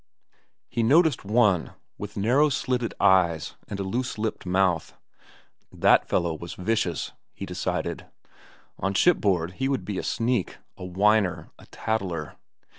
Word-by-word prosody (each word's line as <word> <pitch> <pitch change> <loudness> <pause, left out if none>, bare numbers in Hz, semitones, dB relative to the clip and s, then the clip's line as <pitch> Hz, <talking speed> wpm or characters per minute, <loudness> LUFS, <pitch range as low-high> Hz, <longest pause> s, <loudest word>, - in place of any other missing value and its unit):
He 120 - -2
noticed 150 +4 +4
one 105 -4 +2 0.2
with 105 0 -7
narrow 130 +9 +3
slitted 125 -3 -1
eyes 85 -4 +3
and 100 -2 -5
a - - -1
loose 120 +6 -3
lipped 110 -3 -3
mouth. 90 -3 +1 0.7
That - - +3
fellow 85 -1 +1
was 85 +2 -8
vicious, 95 -4 -1 0.2
he - - -6
decided. - - -3 0.7
On 95 +1 -1
shipboard 95 - +3
he 135 - +1
would 135 - -1
be 100 -3 -3
a - - -4
sneak, 120 -4 -1 0.2
a - - -10
whiner, 95 +1 +1
a - - -16
tattler. 90 -9 -3
100 Hz, 135 wpm, -25 LUFS, 90-120 Hz, 0.7 s, noticed